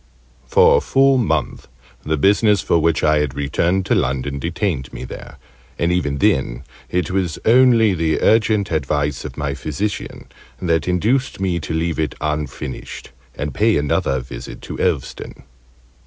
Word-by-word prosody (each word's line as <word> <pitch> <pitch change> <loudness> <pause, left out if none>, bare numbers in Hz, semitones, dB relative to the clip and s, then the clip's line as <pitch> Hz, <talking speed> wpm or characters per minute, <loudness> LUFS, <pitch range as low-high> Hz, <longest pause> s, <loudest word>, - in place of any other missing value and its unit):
For - - +5
a - - +1
full 135 0 +3
month 80 - -1 0.3
the 80 +1 -1
business, 105 +5 +3
for 85 - +2
which 80 -2 +1
I 75 0 +4
had 75 -3 -2
returned 85 +6 0
to - - +1
London, 70 +2 -1
detained 85 - -2
me - - -7
there: - - -9 0.4
and 85 - +1
even 75 -6 0
then - - +1 0.3
it 90 -1 -1
was 90 -4 -1
only 115 -3 +5
the 80 -2 0
urgent 110 -3 +2
advice 75 -2 -1
of - - -8
my 70 -1 -2
physician 75 +9 -4 0.3
that 85 -3 0
induced 110 +10 0
me 90 -3 0
to 80 0 -4
leave 80 0 -1
it 75 -4 -1
unfinished 75 -5 -5 0.2
and 70 -1 -4
pay 110 - +2
another 70 -2 0
visit - - -9
to - - -7
Elveston. - - -3
80 Hz, 155 wpm, -19 LUFS, 70-95 Hz, 0.4 s, For